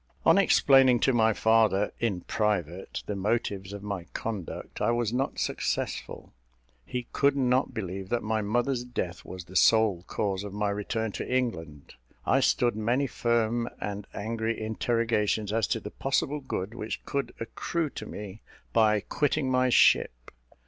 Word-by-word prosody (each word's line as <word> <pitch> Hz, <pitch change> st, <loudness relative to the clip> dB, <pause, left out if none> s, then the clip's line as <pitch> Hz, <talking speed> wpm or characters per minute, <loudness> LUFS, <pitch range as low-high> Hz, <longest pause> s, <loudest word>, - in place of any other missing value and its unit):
On -, -, +7 dB
explaining 135 Hz, -8 st, +5 dB
to 135 Hz, -, +3 dB
my 110 Hz, -1 st, +4 dB
father, 110 Hz, -2 st, +3 dB
in 100 Hz, -7 st, -1 dB
private, 95 Hz, -5 st, -2 dB
the 105 Hz, -, -3 dB
motives 100 Hz, -1 st, -1 dB
of 100 Hz, 0 st, -7 dB
my 100 Hz, -4 st, -4 dB
conduct, 105 Hz, -7 st, -5 dB
I 105 Hz, -, +2 dB
was 120 Hz, -1 st, 0 dB
not 135 Hz, +2 st, -1 dB
successful. -, -, -3 dB, 0.5 s
He 125 Hz, -1 st, -3 dB
could 140 Hz, 0 st, +3 dB
not 130 Hz, 0 st, +1 dB
believe 95 Hz, -3 st, -5 dB
that 120 Hz, -1 st, 0 dB
my 110 Hz, 0 st, 0 dB
mother's 120 Hz, +4 st, 0 dB
death 90 Hz, -8 st, -4 dB
was 90 Hz, -1 st, -8 dB
the 95 Hz, -, -14 dB
sole 110 Hz, -3 st, +4 dB
cause 100 Hz, -2 st, -2 dB
of 100 Hz, -1 st, -7 dB
my 105 Hz, -1 st, 0 dB
return 105 Hz, +2 st, -2 dB
to -, -, -5 dB
England. 80 Hz, -, -2 dB, 0.3 s
I -, -, +3 dB
stood 120 Hz, -3 st, +2 dB
many 120 Hz, +6 st, +1 dB
firm 120 Hz, -1 st, 0 dB
and 105 Hz, 0 st, -5 dB
angry 110 Hz, +2 st, -2 dB
interrogations 110 Hz, -1 st, 0 dB
as 110 Hz, -2 st, +1 dB
to 115 Hz, -, 0 dB
the 105 Hz, -1 st, -8 dB
possible 135 Hz, +2 st, -1 dB
good 115 Hz, -6 st, -4 dB
which 110 Hz, -2 st, -5 dB
could 140 Hz, -1 st, -3 dB
accrue 150 Hz, +7 st, -3 dB
to -, -, -7 dB
me 105 Hz, 0 st, -8 dB, 0.3 s
by 105 Hz, -2 st, +4 dB
quitting 145 Hz, +2 st, 0 dB
my 130 Hz, 0 st, +3 dB
ship. -, -, +3 dB
110 Hz, 155 wpm, -28 LUFS, 100-120 Hz, 0.5 s, On